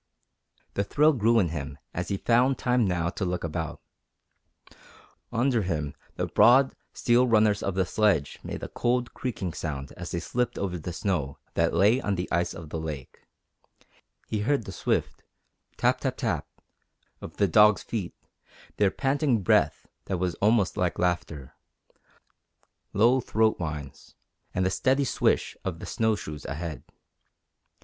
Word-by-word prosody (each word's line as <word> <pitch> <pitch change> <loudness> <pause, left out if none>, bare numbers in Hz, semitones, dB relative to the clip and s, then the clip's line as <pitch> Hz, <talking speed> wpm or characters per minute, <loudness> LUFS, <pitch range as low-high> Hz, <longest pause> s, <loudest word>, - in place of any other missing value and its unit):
The 100 - 0
thrill 150 +10 +3
grew 115 -2 +3
in 95 -7 +3
him 75 -4 -5 0.2
as 90 0 -3
he 100 - -1
found 125 +5 +3
time 125 -4 +2
now 85 -2 0
to 100 - -4
look 90 -1 -2
about. 80 -1 -4 1.5
Under 120 0 +2
him 80 -6 -2 0.2
the - - -1
broad, 130 +3 +5 0.2
steel 125 +1 +3
runners 110 -3 +3
of 100 - -2
the 95 -1 +2
sledge 105 -9 +1
made - - -6
a - - -3
cold, 120 0 -1
creaking 100 -9 -4
sound 70 -3 -5
as 90 0 -8
they 85 - -2
slipped 125 +8 -2
over 90 -3 -2
the 90 - -5
snow 85 -7 -2 0.2
that - - +1
lay 110 +7 +4
on 100 -5 -1
the 90 0 -3
ice 85 +1 0
of 80 -2 -9
the 80 - -3
lake; 75 -5 -7 1.0
he 110 - -2
heard 120 +2 0
the - - -6
swift 90 - -1 0.6
tap, - - +2
tap, - - -2
tap - - -1 0.7
of - - -9
the 100 - +3
dogs' 105 +4 +5
feet, 105 -7 -4 0.6
their 100 -2 +4
panting 135 -2 0
breath - - +2 0.2
that 95 - -2
was 90 0 -1
almost 105 -2 +3
like 90 -1 0
laughter, 85 -6 -2 1.4
low 120 +6 +4
throat 110 -1 +1
whines, 75 -5 -6 0.4
and 95 - 0
the 95 - +1
steady 135 +6 +2
swish - - +1
of 95 -3 -3
the - - -8
snow 110 -1 +1
shoes 75 -7 -7
ahead. 75 -2 -5
95 Hz, 155 wpm, -27 LUFS, 85-115 Hz, 1.5 s, broad